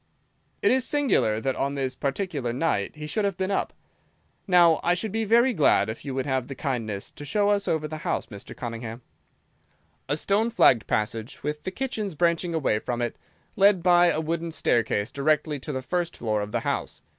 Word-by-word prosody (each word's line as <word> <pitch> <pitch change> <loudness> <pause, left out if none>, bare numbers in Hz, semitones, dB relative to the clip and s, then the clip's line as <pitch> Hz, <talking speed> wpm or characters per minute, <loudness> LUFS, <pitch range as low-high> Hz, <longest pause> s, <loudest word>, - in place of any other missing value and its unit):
"It - - +5
is 260 0 +3
singular 260 - +2
that 130 +3 -1
on 140 +1 -1
this 135 -2 -2
particular 140 -4 -2
night 125 -5 -1
he 150 0 -7
should 210 +8 -1
have 200 -3 -1
been 190 +1 -1
up. - - 0 0.8
Now, 175 -3 +5
I 175 - +3
should 200 +4 -3
be 225 +1 -1
very 235 +4 +4
glad 155 - +3
if 110 - -6
you 135 -2 -5
would 130 - -1
have 130 -3 -1
the 135 - -7
kindness 115 -8 -3
to - - -11
show 205 +8 +1
us 205 -1 +1
over 155 -1 0
the 155 +1 -6
house, - - -2
Mr. 100 -2 -10
Cunningham." 115 0 -6 1.1
A 145 - +1
stone 205 +7 +1
flagged 125 - +4
passage, 110 +2 -2
with 150 +1 -3
the - - -1
kitchens 215 -6 -3
branching 170 +1 +1
away 135 -9 +1
from 120 +2 -3
it, 120 -1 -2 0.4
led 195 -3 +4
by 175 -1 +6
a 155 - 0
wooden 165 +1 -2
staircase 115 -8 0
directly 150 +1 0
to 140 - -6
the 130 -2 -4
first 175 +4 -2
floor 110 -2 -1
of 105 0 -5
the - - -1
house. - - -3
150 Hz, 200 wpm, -26 LUFS, 125-185 Hz, 1.1 s, by